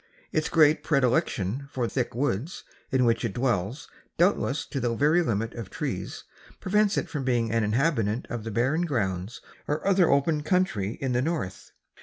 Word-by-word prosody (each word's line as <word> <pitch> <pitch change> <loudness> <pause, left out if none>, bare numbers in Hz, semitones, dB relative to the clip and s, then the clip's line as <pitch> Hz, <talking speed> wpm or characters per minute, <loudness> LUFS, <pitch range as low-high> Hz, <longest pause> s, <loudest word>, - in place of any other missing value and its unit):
Its 155 - 0
great 155 -2 +5
predilection 130 - +1
for 125 -3 -1
thick 125 -1 -2
woods, 135 - -2 0.3
in 130 -1 +2
which 115 0 +2
it 110 -5 -2
dwells 120 0 -1 0.3
doubtless 170 -5 +2
to 140 - -4
the 120 -2 0
very 150 +7 +3
limit 115 -6 -1
of 115 -5 -7
trees, - - -4 0.4
prevents 210 +2 +2
it - - 0
from 145 -3 -4
being 120 -3 +1
an 115 -1 +1
inhabitant 115 -1 +1
of 120 -3 -5
the 115 - -4
barren 130 +9 +1
grounds 105 - -2 0.3
or 150 +1 -2
other 190 -3 +4
open 150 +2 +2
country 150 - 0
in 135 -2 -1
the 125 0 +1
north. 145 - -3
130 Hz, 170 wpm, -26 LUFS, 115-155 Hz, 0.4 s, great